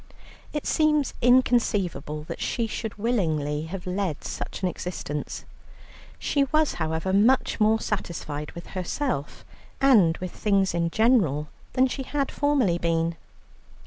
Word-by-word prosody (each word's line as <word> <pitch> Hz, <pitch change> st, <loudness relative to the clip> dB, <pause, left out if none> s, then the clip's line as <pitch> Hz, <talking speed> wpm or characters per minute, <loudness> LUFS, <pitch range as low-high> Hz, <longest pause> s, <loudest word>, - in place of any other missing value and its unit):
It 295 Hz, -, -3 dB
seems 300 Hz, -2 st, +2 dB
inconceivable 215 Hz, -, +2 dB
that -, -, -7 dB
she 235 Hz, -, 0 dB
should 220 Hz, -1 st, -5 dB
willingly 160 Hz, -10 st, 0 dB
have 180 Hz, +1 st, -6 dB
led 180 Hz, -4 st, -2 dB
such -, -, -5 dB
an -, -, +3 dB
existence. 170 Hz, -5 st, -5 dB, 0.7 s
She 280 Hz, -1 st, +1 dB
was 310 Hz, +2 st, +2 dB
however, 160 Hz, +4 st, -1 dB
much 230 Hz, +7 st, +3 dB
more 220 Hz, +1 st, +4 dB
satisfied 160 Hz, -8 st, -4 dB
with 170 Hz, -, -9 dB
herself 185 Hz, -, -3 dB, 0.3 s
and 215 Hz, -12 st, +5 dB
with 185 Hz, -1 st, -5 dB
things 195 Hz, -3 st, +1 dB
in 170 Hz, -1 st, 0 dB
general, 170 Hz, -, +2 dB, 0.2 s
than 255 Hz, -, +4 dB
she 265 Hz, +1 st, -3 dB
had 275 Hz, +1 st, -2 dB
formerly 270 Hz, -12 st, +2 dB
been. 165 Hz, 0 st, 0 dB
195 Hz, 130 wpm, -26 LUFS, 165-250 Hz, 0.7 s, and